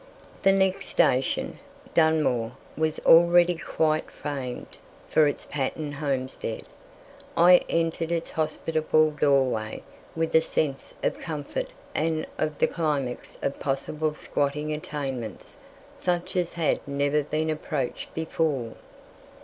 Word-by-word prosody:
The 195 - +5
next 190 -1 +1
station, 135 -6 +1 0.3
Dunmore, 150 -8 +2 0.2
was 155 0 0
already 175 +1 +7
quite 155 -2 0
famed 135 -4 -6 0.3
for 155 -1 +4
its 145 - -3
pattern 145 +2 -3
homestead. 135 -3 -3 0.7
I 180 +1 +8
entered 165 0 0
its 165 -1 -2
hospitable 155 0 +1
doorway 135 -7 +1 0.3
with 165 0 -1
a 160 - +7
sense 140 -4 -2
of - - 0
comfort 160 - -4 0.3
and 160 0 0
of 150 -1 -1
the - - +4
climax 145 -7 -2
of 140 - -2
possible 150 +3 -1
squatting 150 +1 -1
attainments 135 -7 -5 0.3
such 175 0 -1
as 175 -2 0
had 165 -3 +1
never 140 +1 +1
been 155 +2 -1
approached 150 -4 -3
before. 155 -7 -1
155 Hz, 115 wpm, -26 LUFS, 140-165 Hz, 0.7 s, I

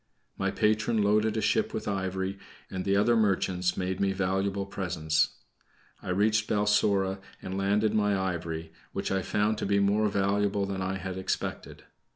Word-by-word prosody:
My 95 - -1
patron 105 +2 +1
loaded 105 +2 +2
a - - +1
ship - - +1
with - - -4
ivory, 95 -1 -2 0.3
and 95 -1 -4
the 100 0 +2
other 110 +4 +4
merchants 95 -4 +1
made 95 0 -2
me 100 -1 +1
valuable 95 +1 -1
presents. 85 -5 0 0.7
I - - -7
reached 105 +3 +2
Balsora 100 -2 +2 0.2
and 95 - -6
landed 100 +2 +1
my 105 -2 +2
ivory, 85 -3 -3 0.2
which - - -2
I 95 0 +1
found 105 +3 0
to - - -2
be 100 0 +2
more 105 +2 +3
valuable 100 0 +1
than 95 -1 -3
I 95 +1 -1
had 95 0 -5
expected. 95 - -4
100 Hz, 165 wpm, -28 LUFS, 95-105 Hz, 0.7 s, other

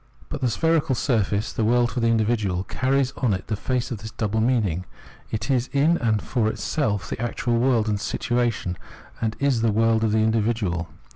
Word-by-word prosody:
But - - -5
the 125 - +2
spherical 160 +1 +1
surface, 105 -5 0
the 115 - -1
world 120 +2 +3
for 125 - -2
the 115 - +2
individual, 110 -5 +1
carries 130 +5 0
on 105 -8 +1
the 110 - -2
face 125 +4 -2
of 115 - -4
it - - -15
this 110 - -6
double 110 0 -1
meaning: 105 -8 +1 0.4
it 110 +4 -2
is 130 -1 +1
in 150 +5 +3
and 110 -3 +1
for 120 -4 0
itself 110 - -1
the - - -3
actual 120 0 0
world 120 -3 +2
and 105 -1 0
situation, 120 -7 -1 0.4
and 110 -1 -1
it 140 - 0
is 130 -5 +2
the 115 -1 +2
world 115 +1 +2
of 110 - +2
the 110 - +2
individual. 110 -6 0
115 Hz, 200 wpm, -24 LUFS, 105-125 Hz, 0.4 s, world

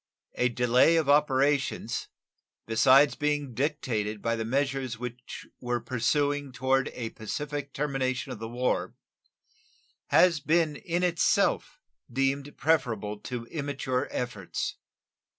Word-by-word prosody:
A 125 - +1
delay 125 +6 +4
of 160 -3 +2
operations 145 -1 +2 0.6
(besides 130 +5 +5
being 145 -3 -1
dictated 115 -7 -1
by 115 +2 0
the 115 - -2
measures 135 0 -1
which 125 +1 -7
were 120 -1 -1
pursuing 140 +4 0
toward 130 +1 +1
a 115 -2 -4
pacific 145 +5 -5
termination 135 -2 -2
of - - -6
the 115 - -5
war) 125 +2 -1 1.1
has 175 -4 +5
been 155 +1 +2
in 175 +4 -2
itself 170 -2 +1 0.3
deemed 135 +2 -1
preferable 115 -9 0
to 120 0 -6
immature 140 -2 -2
efforts. 110 -7 -4
135 Hz, 115 wpm, -28 LUFS, 120-145 Hz, 1.1 s, besides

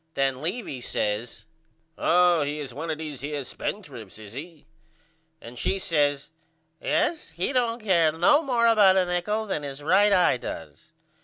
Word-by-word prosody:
Then 135 -1 0
Levy 165 - -4
says 110 0 -3 0.5
Oh 175 -1 +3
he 145 +1 -2
is 135 -5 -6
one 160 +5 -5
of 155 - -2
these 150 -4 -6
here 145 0 -4
spendrifts 120 - -7
is 105 -1 -11
he? 155 +3 -9 0.7
and 120 -2 -10
she 195 - 0
says 145 -6 0 0.5
Yes 315 +1 0
he 180 +10 -3
don't 235 -2 0
care 170 -6 +3
no 175 - +4
more 245 -6 +1
about 205 -5 +5
a 185 - +3
nichol 180 +5 -1
than 190 -7 -3
his 140 0 -7
right 195 +6 +4
eye 180 -9 +4
does. 80 -10 -9
160 Hz, 160 wpm, -25 LUFS, 140-200 Hz, 0.7 s, about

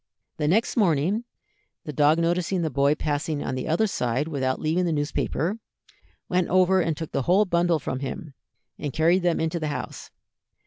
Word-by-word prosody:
The 150 - 0
next 215 +9 +2
morning 190 +3 +2 0.6
the 150 - -6
dog 150 +2 +4
noticing 175 +2 0
the 160 - -1
boy 140 +3 +2
passing 150 0 -2
on - - -3
the 130 - -3
other 170 +8 +2
side 130 - -1
without 130 -4 -1
leaving 165 +4 0
the 170 - 0
newspaper, 160 +6 -1 0.7
went 180 -1 0
over 185 +1 +4
and 165 -3 -1
took 160 - -6
the - - 0
whole 195 +4 +5
bundle 175 -2 +2
from 130 -3 -4
him, 140 +2 -6 0.5
and 145 -3 -4
carried 170 +4 +3
them 175 -2 +1
into 160 +1 -1
the 155 - -2
house. 145 - -5
160 Hz, 180 wpm, -25 LUFS, 145-180 Hz, 0.7 s, whole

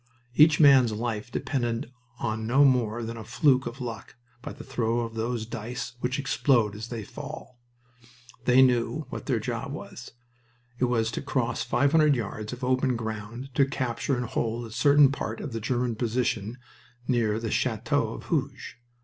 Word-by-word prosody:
Each 150 +3 +6
man's 135 -6 +7
life 110 0 -3
depended 120 -3 -2 0.3
on 110 -1 -3
no 135 +5 +5
more 120 -3 +2
than 115 +1 -5
a 110 - -7
fluke 130 +3 +2
of 120 +3 -7
luck 115 -4 -6 0.3
by - - -6
the - - -10
throw 120 -3 -1
of 115 -1 -4
those 115 0 -2
dice 120 +3 -5
which 125 +2 -1
explode 125 -6 +2
as 110 +2 -6
they 115 -3 -5
fall. 120 +4 -9 0.9
They 130 +1 +6
knew 125 +3 +1
what - - -6
their - - +1
job - - -4
was. - - -9 0.7
It 125 - +3
was 115 -2 +1
to - - -4
cross 130 -5 -1
five 140 +4 +2
hundred 155 -3 +5
yards 110 -2 -4
of 125 +1 -7
open 130 0 +1
ground 115 +3 -6
to 140 - +4
capture 130 0 -1
and 125 - -2
to - - -10
hold 115 +1 -1
a 115 - -10
certain 140 +3 +5
part 110 -5 -4
of 140 - -6
the 115 - -3
German 120 +1 0
position 115 -1 -1 0.5
near 115 -4 +1
the 115 -2 -3
Chateau - - 0
of - - -9
Hooge. - - -3
120 Hz, 175 wpm, -27 LUFS, 115-130 Hz, 0.9 s, man's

